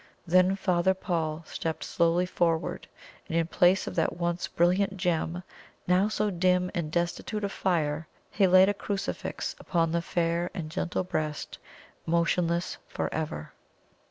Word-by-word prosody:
Then 185 +2 +4
Father 190 -1 +2
Paul 165 -3 -2
stepped 160 +1 -4
slowly 170 +1 +2
forward, 165 -2 -1 0.4
and 165 - 0
in 165 - +2
place 180 +3 +3
of - - -5
that 165 0 +1
once 175 0 -1
brilliant 190 +3 +2
gem, 175 -1 -1 0.4
now 180 +3 +3
so 210 -1 0
dim 180 0 +2
and 155 -3 -2
destitute 175 +5 -2
of 200 - -1
fire, 155 -5 0 0.2
he 195 -2 +3
laid 185 +1 +7
a 205 - +2
crucifix 200 -1 -4
upon 165 -2 0
the 170 0 +1
fair 170 +1 0
and 155 -3 -5
gentle 170 +2 -1
breast, 155 -4 -3 0.5
motionless 170 +1 +1
for - - -3
ever. 155 - -4
175 Hz, 145 wpm, -28 LUFS, 165-185 Hz, 0.5 s, laid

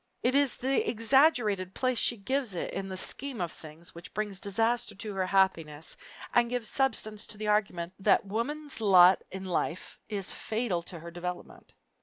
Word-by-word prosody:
It 250 - +2
is 280 -2 +3
the 265 +2 0
exaggerated 225 - +3
place 255 -2 +1
she 240 - +2
gives 245 0 -2
it - - -3
in 195 0 -4
the 190 - -5
scheme 275 +5 0
of 175 -3 -2
things, 160 +3 -11
which 170 +1 -12
brings 210 -3 -2
disaster 225 +5 0
to 210 +1 -6
her 190 -1 -1
happiness 165 -6 +1 0.4
and 240 -1 +4
gives 245 -3 -1
substance 220 -6 0
to 210 - -8
the 210 0 -3
argument 185 -4 0
that 195 - +3
woman's 275 +7 -4
lot 185 -3 +7
in 190 0 -7
life 175 -1 -3
is 200 -3 -2
fatal 220 -6 -2
to 175 - -7
her 170 +1 -9
development. 175 +1 -7
205 Hz, 175 wpm, -29 LUFS, 185-240 Hz, 0.4 s, lot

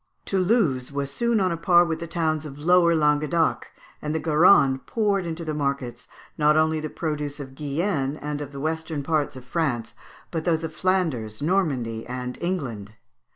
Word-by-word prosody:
Toulouse 185 - +1
was 140 0 -3
soon 235 +8 +1
on 185 -2 +1
a 170 - -2
par 175 0 +5
with 160 -2 -2
the 170 - -5
towns 160 -2 -1
of 145 -2 -8
Lower 170 +2 +4
Languedoc, 150 +1 +1 0.3
and 150 +1 -3
the - - +1
Garonne 150 -4 +5
poured 200 -5 0
into 165 0 -5
the 155 - -2
markets, 140 -4 -3 0.3
not 150 0 +4
only 155 0 +2
the 155 0 -4
produce 150 -3 -4
of 135 -2 -8
Guienne, 145 0 -1
and 150 0 -4
of 145 -1 -6
the 140 - -8
western 160 0 -2
parts 150 -2 0
of 130 -1 -10
France, 130 -6 -1 0.4
but 165 - -1
also 175 - -1
those 160 -1 +1
of 160 -1 -4
Flanders, 155 - -1
Normandy, 135 -11 0
and 125 0 -4
England. 125 - -3
155 Hz, 180 wpm, -24 LUFS, 140-170 Hz, 0.4 s, par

